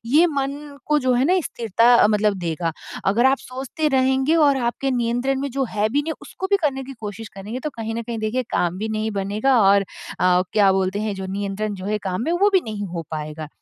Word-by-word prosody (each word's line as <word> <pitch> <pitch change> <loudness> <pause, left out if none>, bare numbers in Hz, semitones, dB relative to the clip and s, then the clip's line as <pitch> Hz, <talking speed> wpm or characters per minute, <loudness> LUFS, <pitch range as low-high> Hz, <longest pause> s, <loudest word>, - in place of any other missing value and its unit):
ये 305 +8 +5
मन 280 0 -4
को 300 0 +3
जो 255 -1 +2
है 250 +2 +2
ना 360 +5 +3
स्थिरता, 230 +1 +4
मतलब 210 -1 +2
देगा। 165 -1 -2 0.3
अगर 230 +6 +4
आप 270 +1 +3
सोचते 265 +4 -3
रहेंगे 265 +2 +2
और 285 -4 +4
आपके 270 +3 -2
नियंत्रण 245 +2 0
में 280 0 -3
जो 270 +1 -1
है 210 0 +1
भी 285 +6 +1
नहीं 320 +2 -3
उसको 380 - -5
भी 400 - +5
करने 270 -3 0
की 270 - -8
कोशिश 210 +1 -6
करेंगे, 210 +6 -6
तो 305 - -3
कहीं 225 -3 -5
न 235 - -2
कहीं 230 0 -5
देखिए 220 +4 -1
काम 175 +1 0
भी 220 +2 -3
नहीं 220 0 -2
बनेगा। 210 +6 +1
और 200 +1 +5 0.4
अ, 180 0 +4
क्या 200 -2 +5
बोलते 190 +1 0
हैं? 215 -1 -2
जो 190 -1 -5
नियंत्रण 200 +2 -3
जो 185 -1 -8
है 210 0 0
काम 185 +5 -2
में, 330 - 0
वो 400 +4 +3
भी 380 - +6
नहीं 210 -3 -4
हो 170 - -3
पाएगा। 155 0 -5
230 Hz, 230 wpm, -22 LUFS, 200-270 Hz, 0.4 s, भी